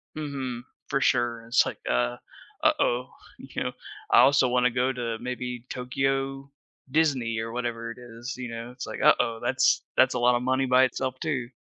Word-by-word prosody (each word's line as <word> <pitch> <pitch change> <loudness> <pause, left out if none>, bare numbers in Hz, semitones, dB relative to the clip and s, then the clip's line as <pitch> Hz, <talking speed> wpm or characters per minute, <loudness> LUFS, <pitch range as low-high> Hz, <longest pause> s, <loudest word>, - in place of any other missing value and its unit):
Mhm, 135 -5 -4 0.2
for 140 -1 0
sure, 120 -3 +1
it's 115 0 +3
like, - - -4
uh, - - +1 0.5
"Uh-oh," 125 +1 +2 0.3
you - - -5
know, - - -2 0.4
I - - +6
also 135 0 +6
wanna 125 0 +3
go 125 +2 +1
to 115 -2 -3
maybe 125 -1 -5
Tokyo 135 +2 -2 0.4
Disney 130 -8 +1
or 115 0 -4
whatever 115 -1 -3
it - - -10
is, 120 +1 -8
you 125 -2 -5
know, 115 +1 -6
it's 125 +1 -7
like, - - -6
"Uh-oh, 115 -2 +4
that's 130 +2 +2
that's 130 0 +5
a 125 - -1
lotta 120 0 +4
money 130 +1 +1
by 130 +1 +5
itself 130 +1 -3
too." 130 -6 -2
125 Hz, 175 wpm, -26 LUFS, 120-130 Hz, 0.5 s, I